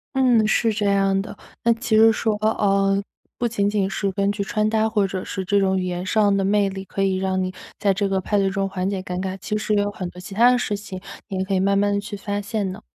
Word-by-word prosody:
嗯， 245 -5 +4
是 225 +1 +2
这 210 -1 -1
样 195 -1 +2
的。 205 - -9 0.3
那 235 - +4
其 230 -1 -1
实 225 +1 +7
说 220 -1 0
呃， 195 -2 +2 0.4
不 240 - 0
仅 205 -3 0
仅 200 -2 0
是 195 0 -1
根 200 +1 0
据 205 -1 -2
穿 215 +2 0
搭 220 0 +1
或 210 -3 +1
者 185 0 -4
是 190 -2 -5
这 200 +1 +2
种 190 -1 +2
语 185 - -2
言 180 0 -3
上 205 0 +3
的 195 - +1
魅 200 0 +2
力， 190 0 -6
可 195 +2 -2
以 190 -1 +1
让 190 0 0
你 185 - -3 0.2
在 200 -2 +2
这 200 0 -1
个 190 -1 +1
派 205 +2 -1
对 195 -1 +2
中 195 0 -1
缓 190 -1 -2
解 195 -2 -2
尴 180 0 -4
尬， 190 0 -3
其 210 +3 -2
实 215 0 -1
也 205 - +3
有 205 - -1
很 185 -3 -5
多 180 - -12
其 180 +2 -9
他 235 +4 +5
的 250 - +3
事 215 -3 -1
情， 200 -2 -7 0.3
你 190 - -4
也 190 - 0
可 195 - -3
以 185 - +2
慢 195 +1 +2
慢 205 0 +2
地 200 - +1
去 205 +1 -6
发 205 0 -3
现 205 -2 -2
呢。 205 +3 -9
200 Hz, 300 characters per minute, -22 LUFS, 190-215 Hz, 0.4 s, 实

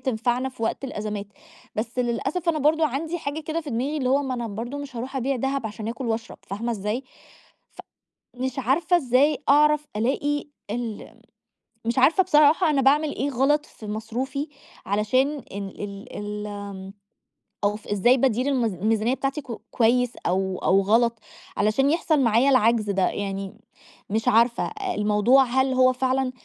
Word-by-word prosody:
تنفعنا 245 +1 0
في 255 -3 -10
وقت 225 - -1
الأزَمات. 210 -4 -4 0.5
بس 230 +3 -3
للأسف 270 +8 -1
أنا 315 -2 +2
برضه 310 +2 +3
عندي 315 +5 -3
حاجة 295 +1 -4
كده 315 +2 -3
في 300 -3 -8
دماغي 265 +7 -1
اللي 255 -3 -1
هو 280 +2 +3
ما 260 -2 -2
أنا 235 -2 -4
برضه 235 +7 -5
مش 275 -4 -8
هاروح 260 +3 -5
أبيع 265 +1 0
دهب 270 -1 -1
عشان 215 0 -6
آكل 240 +2 -4
وأشرب 225 +1 -3
فاهمة 230 +5 -2
إزاي؟ 210 +5 -3 0.7
ف - - -24 0.6
مش 260 +1 -3
عارفة 315 +8 +2
إزاي 275 +1 +3
أعرف 300 +1 +4
ألاقي 285 +5 0 0.3
ال 230 -2 -5 0.7
مش 235 +2 -1
عارفة 325 +8 +5
بصراحة 305 +1 +4
أنا 280 -3 +2
باعمل 290 +3 +3
إيه 285 - -1
غلط 290 +4 +2
في 215 - -12
مصروفي 250 +7 -3 0.4
علشان 210 +7 +2 0.3
إن 200 -1 -4
ال 200 0 -8
ال 210 0 -5
آمم 200 -2 -7 0.7
أو 205 - +2
ف 210 - -12
إزاي 225 +6 +3
بادير 255 +1 +1
الميز 240 -7 +1
الميزانيّة 220 +5 +1
بتاعتي 275 +3 -2
ك - - -25 0.2
كويس 245 +1 +2 0.2
أو 190 +1 0
أو 195 +1 +4
غلط 230 +3 +2 0.4
علشان 215 +7 +2
يحصل 320 -2 +2
معايا 235 +3 +4
العجز 230 -4 +3
ده؟ 190 -1 +2
يعني 195 0 -4 0.6
مش 220 +1 -1
عارفة. 235 +2 +3 0.3
الموضوع 210 +6 +4
هل 260 +1 +1
هو 255 0 +4
فعلًا 260 0 0
250 Hz, 165 wpm, -24 LUFS, 215-275 Hz, 0.7 s, عارفة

